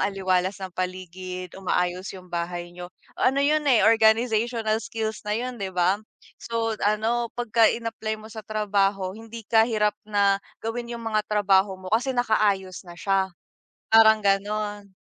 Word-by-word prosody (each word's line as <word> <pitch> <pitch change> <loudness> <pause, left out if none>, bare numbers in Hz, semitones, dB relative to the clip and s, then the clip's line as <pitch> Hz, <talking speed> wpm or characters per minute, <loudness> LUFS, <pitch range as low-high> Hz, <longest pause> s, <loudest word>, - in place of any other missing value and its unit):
aliwalas 190 -1 0
ng 185 - -5
paligid, 185 0 -5
umaayos 180 0 -1
yung 180 -1 -14
bahay 175 0 -3
niyo. 175 0 -8 0.3
Ano 275 +2 +3
'yon 300 0 +2
eh, 235 -6 +5
organizational 225 0 +3
skills 220 -1 -4
na 210 - +1
'yon, 250 0 -4
'di 195 - -2
ba? 180 +3 +2 0.4
So, 230 -1 -2
ano 220 +3 +1
pagka 230 -2 +3
in-apply 225 -1 -3
mo 220 - -11
sa 220 - -6
trabaho 200 -3 0
hindi 225 0 -9
ka 225 +1 +4
hirap 210 -2 +1
na 200 -1 +3 0.3
gawin 235 +1 -4
yung 230 - -9
mga 215 -1 +1
trabaho 200 -2 +3
mo 185 0 -9
kasi 255 +4 +1
nakaayos 205 -6 +1
na 175 - -10
siya, 195 0 +1 0.6
parang 220 -1 +7
gano'n. 205 0 -1
210 Hz, 150 wpm, -25 LUFS, 190-225 Hz, 0.6 s, parang